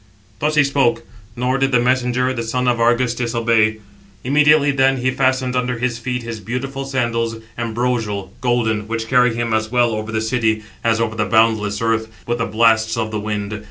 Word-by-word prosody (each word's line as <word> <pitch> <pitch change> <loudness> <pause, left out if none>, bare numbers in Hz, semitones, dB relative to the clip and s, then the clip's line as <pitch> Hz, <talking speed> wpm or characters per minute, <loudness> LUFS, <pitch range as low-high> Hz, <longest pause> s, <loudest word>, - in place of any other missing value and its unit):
Thus 150 +3 0
he 150 - +5
spoke; 130 -4 +1 0.3
nor 125 +2 0
did 135 0 +1
the 125 - +4
messenger, 125 +1 +1
the 120 - -3
son 125 +2 -2
of 120 -1 +1
Argus. 120 +1 +2
disobey. 115 -2 +1 0.5
789 130 - -3
Immediately 150 -1 +5
then 135 -1 +2
he 130 +1 0
fastened 130 -1 0
under 125 -1 -1
his 120 0 -2
feet 125 0 -3
his 115 -1 -6
beautiful 135 +5 -4
sandals, 115 -4 -1 0.2
ambrosial, 115 -4 -2
golden, 115 -4 0
which 115 0 -3
carry 125 -1 +3
him 115 -1 -2
as 110 0 -1
well 120 -1 +2
over 110 0 -4
the 110 - -1
sea, 110 -1 0 0.2
as 115 -1 +2
over 115 -1 -1
the 105 -1 0
boundless 110 -1 +2
earth, 110 0 0 0.2
with 120 +1 -2
the 115 - -1
blasts 110 0 +2
of 110 -1 -2
the 105 - -2
wind. 105 0 -4
120 Hz, 195 wpm, -19 LUFS, 110-125 Hz, 0.5 s, he